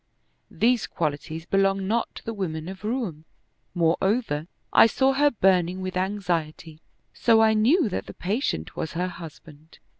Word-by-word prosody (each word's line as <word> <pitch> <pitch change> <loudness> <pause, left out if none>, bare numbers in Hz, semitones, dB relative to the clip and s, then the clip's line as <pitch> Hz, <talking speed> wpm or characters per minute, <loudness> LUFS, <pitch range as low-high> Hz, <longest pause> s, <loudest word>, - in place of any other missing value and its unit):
These 235 0 +1
qualities 160 +1 -3
belong 195 0 +1
not 230 +3 -1
to - - -11
the 230 - -3
women 165 -6 -4
of 190 +2 -8
Roum; 215 - -3 0.5
moreover, 170 0 +1 0.3
I - - +8
saw 265 +4 +2
her 290 +2 +4
burning 185 -6 +2
with 185 0 -5
anxiety; 170 -5 -3 0.3
so 230 -2 +3
I 220 0 +5
knew 250 - +3
that 195 - -4
the - - -9
patient 190 - -2
was 160 - -4
her 180 +2 -1
husband. 160 -2 -12
190 Hz, 150 wpm, -25 LUFS, 165-220 Hz, 0.5 s, I